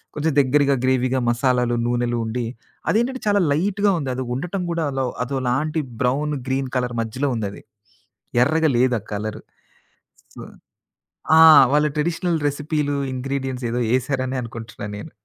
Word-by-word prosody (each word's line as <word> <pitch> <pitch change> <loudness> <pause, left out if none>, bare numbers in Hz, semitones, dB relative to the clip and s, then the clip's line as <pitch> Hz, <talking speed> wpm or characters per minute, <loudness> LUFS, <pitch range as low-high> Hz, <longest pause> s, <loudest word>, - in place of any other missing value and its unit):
కొంచెం 155 +2 0
దెగ్గరగా 140 +1 +3
గ్రేవీగా 130 0 +1
మసాలాలు, 120 0 +1
నూనెలు 120 0 0
ఉండి 115 +2 -3 0.4
అది - - +3
ఏంటంటే, 260 +2 -3
చాలా 205 -1 +3
లైట్‌గా 200 +6 +1
ఉంది. 140 -4 -3
అది 130 0 -3
ఉండటం 180 +7 -3
కూడా 165 -2 -1
అలో 135 -1 -1 0.2
అదోలాంటి 135 +4 -1 0.2
బ్రౌన్, 145 +4 0
గ్రీన్ 135 0 -1
కలర్ 125 -1 -2
మధ్యలో 130 +6 -2
ఉందది. 100 -3 -5 0.8
ఎర్రగా 160 +3 +2
లేదు 125 +1 +3
ఆ - - -23
కలరు, 105 +1 -4 0.9
సొ - - -9 1.0
ఆ! - - +8 0.3
వాళ్ళ 150 +1 +4
ట్రెడిషనల్ 165 +2 0
రెసిపీలు, 145 0 -2 0.2
ఇంగ్రీడియెంట్స్ 130 -1 -3
ఎదో 120 +1 -1 0.2
ఏశారనే 130 0 -2
అనుకుంటున్నా 115 -2 -8
నేను. 105 - -9
135 Hz, 140 wpm, -22 LUFS, 125-150 Hz, 1.0 s, ఆ